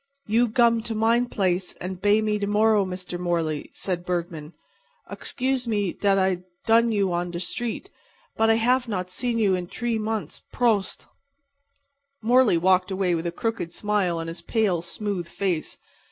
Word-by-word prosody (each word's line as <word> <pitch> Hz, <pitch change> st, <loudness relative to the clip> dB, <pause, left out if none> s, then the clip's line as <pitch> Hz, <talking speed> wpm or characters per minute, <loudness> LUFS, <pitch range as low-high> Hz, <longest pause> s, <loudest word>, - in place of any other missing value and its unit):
"You 230 Hz, +3 st, +3 dB
gum 235 Hz, 0 st, +3 dB
to 225 Hz, -, -2 dB
mine 230 Hz, +3 st, +3 dB
blace 185 Hz, -4 st, -1 dB
and 185 Hz, 0 st, -6 dB
bay 205 Hz, +2 st, +4 dB
me 210 Hz, -1 st, 0 dB
to 200 Hz, -, -1 dB
morrow, 210 Hz, 0 st, +3 dB
Mr. 180 Hz, -1 st, -5 dB
Morley," 165 Hz, -4 st, -1 dB
said 180 Hz, -2 st, -3 dB
Bergman. 170 Hz, -3 st, -4 dB, 0.5 s
"Oxcuse 260 Hz, -1 st, -2 dB
me 205 Hz, -5 st, 0 dB
dat 200 Hz, -1 st, +2 dB
I 190 Hz, -2 st, +2 dB, 0.3 s
dun 230 Hz, +1 st, +4 dB
you 200 Hz, -4 st, +1 dB
on 175 Hz, +1 st, -1 dB
der 175 Hz, -, -5 dB
street. 240 Hz, -, -4 dB, 0.4 s
But 225 Hz, 0 st, +3 dB
I 225 Hz, -, +5 dB
haf 250 Hz, +3 st, +2 dB
not 185 Hz, -4 st, -3 dB
seen 240 Hz, +4 st, -1 dB
you 205 Hz, -4 st, +3 dB
in 180 Hz, -1 st, -2 dB
dree 235 Hz, +3 st, -2 dB
mont'. 220 Hz, 0 st, -3 dB
Pros't!" 220 Hz, -6 st, 0 dB, 1.1 s
Morley 235 Hz, -4 st, +4 dB
walked 185 Hz, +2 st, +3 dB
away 190 Hz, -2 st, 0 dB
with 170 Hz, 0 st, -1 dB
a -, -, -2 dB
crooked 225 Hz, -2 st, -3 dB
smile 205 Hz, -5 st, 0 dB
on 165 Hz, -, -4 dB
his 165 Hz, +1 st, -5 dB
pale, 195 Hz, -3 st, +1 dB
smooth 180 Hz, 0 st, -4 dB
face. 175 Hz, -4 st, -2 dB
200 Hz, 170 wpm, -25 LUFS, 180-225 Hz, 1.1 s, I